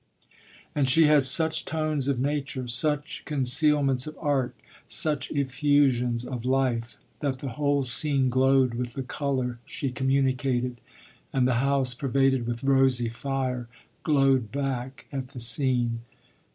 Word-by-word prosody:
And 140 Hz, -3 st, +1 dB
she 160 Hz, +4 st, +5 dB
had 150 Hz, -3 st, +4 dB
such 160 Hz, +4 st, +1 dB
tones 155 Hz, -3 st, -1 dB
of 140 Hz, -2 st, +1 dB
nature, 140 Hz, -2 st, -2 dB
such 150 Hz, +5 st, 0 dB
concealments 140 Hz, -1 st, +1 dB
of 155 Hz, -, -8 dB
art, 140 Hz, -5 st, 0 dB, 0.3 s
such 150 Hz, -2 st, 0 dB
effusions 135 Hz, -3 st, +1 dB
of 125 Hz, -2 st, -5 dB
life, 125 Hz, -4 st, 0 dB, 0.2 s
that 140 Hz, -3 st, -2 dB
the 135 Hz, +1 st, -5 dB
whole 140 Hz, +2 st, 0 dB
scene 135 Hz, +2 st, 0 dB
glowed 130 Hz, 0 st, +3 dB
with 120 Hz, 0 st, -4 dB
the 135 Hz, -, -4 dB
colour 130 Hz, -3 st, -2 dB
she 135 Hz, -, -4 dB
communicated, 130 Hz, -2 st, 0 dB, 0.5 s
and 130 Hz, -2 st, +2 dB
the 130 Hz, -, +2 dB
house, 135 Hz, -2 st, +1 dB
pervaded 135 Hz, -1 st, +1 dB
with 120 Hz, +1 st, -4 dB
rosy 135 Hz, -3 st, +3 dB
fire, 130 Hz, 0 st, -3 dB, 0.3 s
glowed 135 Hz, -6 st, +2 dB
back 135 Hz, -1 st, -4 dB
at 135 Hz, -2 st, -4 dB
the 130 Hz, -1 st, -10 dB
scene. 120 Hz, -1 st, +2 dB
135 Hz, 135 wpm, -26 LUFS, 125-140 Hz, 0.5 s, she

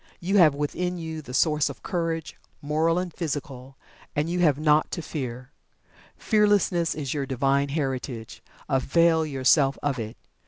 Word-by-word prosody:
You 195 Hz, +4 st, +1 dB
have 155 Hz, -5 st, +6 dB
within 180 Hz, +5 st, -2 dB
you 160 Hz, -2 st, -5 dB
the 125 Hz, -, -11 dB
Source 150 Hz, +2 st, +2 dB
of 140 Hz, -, -10 dB
Courage, 165 Hz, -2 st, -3 dB, 0.2 s
Moral 155 Hz, +3 st, +1 dB
and 180 Hz, -2 st, -3 dB
Physical, 140 Hz, -5 st, -5 dB, 0.4 s
and 150 Hz, +2 st, 0 dB
you 180 Hz, -, -1 dB
have 150 Hz, -6 st, +3 dB
naught 150 Hz, 0 st, +3 dB
to 170 Hz, -, -4 dB
Fear 125 Hz, -4 st, -6 dB, 0.7 s
Fearlessness 205 Hz, -6 st, +2 dB
is 145 Hz, -4 st, -3 dB
your 140 Hz, -3 st, -2 dB
Divine 140 Hz, +2 st, +1 dB
Heritage, 130 Hz, -5 st, -4 dB, 0.3 s
avail 160 Hz, +4 st, +2 dB
yourself 135 Hz, 0 st, +3 dB
of 140 Hz, -3 st, -1 dB
it. 110 Hz, 0 st, -6 dB
150 Hz, 150 wpm, -25 LUFS, 135-165 Hz, 0.7 s, have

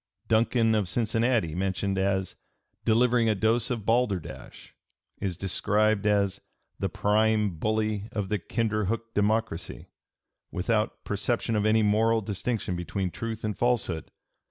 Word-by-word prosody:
(p. -, -, -42 dB
299) -, -, +2 dB, 0.4 s
Duncan, 110 Hz, -, +3 dB
of 95 Hz, -4 st, -2 dB
Cincinnati, 115 Hz, -4 st, +1 dB
mentioned 95 Hz, +2 st, -1 dB
as 95 Hz, -1 st, 0 dB, 0.5 s
"delivering 115 Hz, 0 st, +3 dB
a 110 Hz, -, +2 dB
dose 115 Hz, +4 st, +1 dB
of 115 Hz, -5 st, -3 dB
balderdash," 115 Hz, -8 st, -2 dB, 0.5 s
is 95 Hz, -4 st, -2 dB
described 105 Hz, +3 st, +1 dB
as 100 Hz, -1 st, +1 dB, 0.4 s
"the -, -, -1 dB
prime 105 Hz, 0 st, +2 dB
bully 110 Hz, 0 st, -1 dB
of 100 Hz, -3 st, -3 dB
the 105 Hz, -, 0 dB
Kinderhook 115 Hz, +2 st, -2 dB
Democracy," 105 Hz, -4 st, -1 dB, 0.6 s
without 105 Hz, +4 st, -1 dB
"perception 110 Hz, +3 st, -1 dB
of 105 Hz, 0 st, +2 dB
any 110 Hz, 0 st, +4 dB
moral 110 Hz, +2 st, +3 dB
distinction 100 Hz, -1 st, -2 dB
between 90 Hz, +2 st, -3 dB
truth 115 Hz, +1 st, -5 dB
and 105 Hz, -1 st, -2 dB
falsehood 120 Hz, -9 st, 0 dB
105 Hz, 130 wpm, -27 LUFS, 100-115 Hz, 0.6 s, any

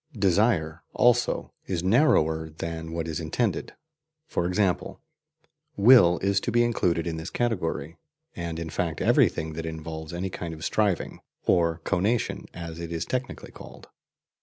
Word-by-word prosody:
"Desire," 95 Hz, -5 st, +2 dB
also, 120 Hz, 0 st, +2 dB, 0.2 s
is 90 Hz, -3 st, -2 dB
narrower 80 Hz, -, +3 dB
than 80 Hz, +1 st, -6 dB
what 85 Hz, 0 st, -3 dB
is 80 Hz, 0 st, -3 dB
intended: 90 Hz, +7 st, -2 dB, 0.5 s
for 85 Hz, -, -1 dB
example, 90 Hz, 0 st, 0 dB, 0.8 s
WILL 100 Hz, -5 st, +7 dB
is 100 Hz, 0 st, +2 dB
to 120 Hz, -, -3 dB
be 120 Hz, +1 st, +4 dB
included 90 Hz, -8 st, +1 dB
in 85 Hz, -1 st, -3 dB
this 80 Hz, +2 st, -5 dB
category, 85 Hz, -, -2 dB, 0.4 s
and 85 Hz, -1 st, -4 dB
in 85 Hz, -1 st, -5 dB
fact 80 Hz, -1 st, -2 dB
every -, -, +4 dB
thing 80 Hz, 0 st, -5 dB
that 80 Hz, +1 st, -5 dB
involves 80 Hz, 0 st, -6 dB
any 90 Hz, +2 st, -3 dB
kind 85 Hz, -2 st, -5 dB
of 80 Hz, -, -7 dB
striving, 105 Hz, -5 st, 0 dB, 0.3 s
or 85 Hz, -2 st, +2 dB
"conation" 100 Hz, +5 st, 0 dB
as 85 Hz, -1 st, -7 dB
it 85 Hz, -1 st, -6 dB
is 85 Hz, -1 st, -2 dB
technically 130 Hz, -1 st, -4 dB
called. -, -, -13 dB
85 Hz, 150 wpm, -26 LUFS, 80-100 Hz, 0.8 s, WILL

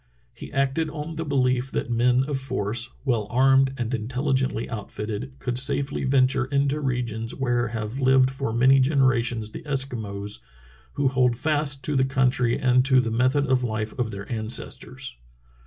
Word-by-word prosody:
He -, -, -10 dB
acted 140 Hz, +3 st, 0 dB
on 155 Hz, +1 st, -6 dB
the 165 Hz, -, -3 dB
beUef 130 Hz, -2 st, +1 dB
that 120 Hz, -, -3 dB
men 125 Hz, +2 st, +3 dB
of 140 Hz, -1 st, -2 dB
force, 120 Hz, -2 st, -1 dB, 0.2 s
well 115 Hz, -6 st, 0 dB
armed 135 Hz, +1 st, +4 dB
and 120 Hz, +1 st, -3 dB
intelligently 130 Hz, +1 st, -1 dB
outfitted, 110 Hz, +3 st, -5 dB
could 125 Hz, -1 st, -3 dB
safely 135 Hz, +1 st, 0 dB
venture 130 Hz, 0 st, +3 dB
into 140 Hz, +2 st, 0 dB
regions 120 Hz, -4 st, -2 dB
where 120 Hz, -2 st, 0 dB
have 110 Hz, +2 st, -4 dB
lived 130 Hz, 0 st, +4 dB
for 135 Hz, -3 st, -3 dB
many 130 Hz, +4 st, +5 dB
generations 125 Hz, -5 st, +2 dB
the -, -, -8 dB
Eskimos, 110 Hz, -8 st, -3 dB, 0.5 s
who 140 Hz, -, +1 dB
hold 125 Hz, -3 st, +2 dB
fast 145 Hz, -2 st, 0 dB
to 150 Hz, -, -1 dB
the 130 Hz, -, +3 dB
country 130 Hz, -2 st, +1 dB
and 125 Hz, 0 st, +3 dB
to 130 Hz, -1 st, +5 dB
the 115 Hz, -2 st, -1 dB
method 130 Hz, +5 st, +2 dB
of 130 Hz, -2 st, +1 dB
life 110 Hz, -2 st, -3 dB
of 120 Hz, -2 st, 0 dB
their 100 Hz, -2 st, -7 dB
ancestors. 120 Hz, -, -3 dB
130 Hz, 160 wpm, -24 LUFS, 120-135 Hz, 0.5 s, many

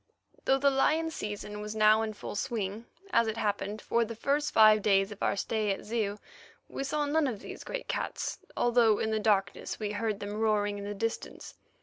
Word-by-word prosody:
Though 270 Hz, -, +4 dB
the 280 Hz, +1 st, +3 dB
lion 315 Hz, +4 st, +2 dB
season 210 Hz, -5 st, -5 dB
was 210 Hz, +1 st, -5 dB
now 215 Hz, 0 st, +5 dB
in 220 Hz, -1 st, -2 dB
full 205 Hz, -, -7 dB
swing, 215 Hz, -1 st, -3 dB, 0.2 s
as 230 Hz, -7 st, +3 dB
it 220 Hz, 0 st, -2 dB
happened, 210 Hz, 0 st, -2 dB
for 235 Hz, -, +2 dB
the 230 Hz, 0 st, -5 dB
first 285 Hz, +5 st, 0 dB
five 215 Hz, -1 st, +7 dB
days 195 Hz, -1 st, +3 dB
of 205 Hz, -, -10 dB
our -, -, +1 dB
stay 215 Hz, +1 st, -1 dB
at 195 Hz, -, -4 dB
Zeu 210 Hz, -2 st, -1 dB, 0.5 s
we -, -, -4 dB
saw 295 Hz, +2 st, -1 dB
none 295 Hz, +1 st, +2 dB
of 225 Hz, -6 st, -4 dB
these -, -, -8 dB
great -, -, -5 dB
cats, -, -, -3 dB, 0.2 s
although 235 Hz, -3 st, +4 dB
in 220 Hz, -, -1 dB
the 220 Hz, -, +1 dB
darkness 200 Hz, -4 st, 0 dB
we 210 Hz, -2 st, -2 dB
heard 210 Hz, -1 st, -2 dB
them 205 Hz, 0 st, -5 dB
roaring 205 Hz, -2 st, +1 dB
in 200 Hz, -, -6 dB
the 205 Hz, 0 st, -4 dB
distance. 225 Hz, +3 st, -4 dB
215 Hz, 205 wpm, -30 LUFS, 205-235 Hz, 0.5 s, five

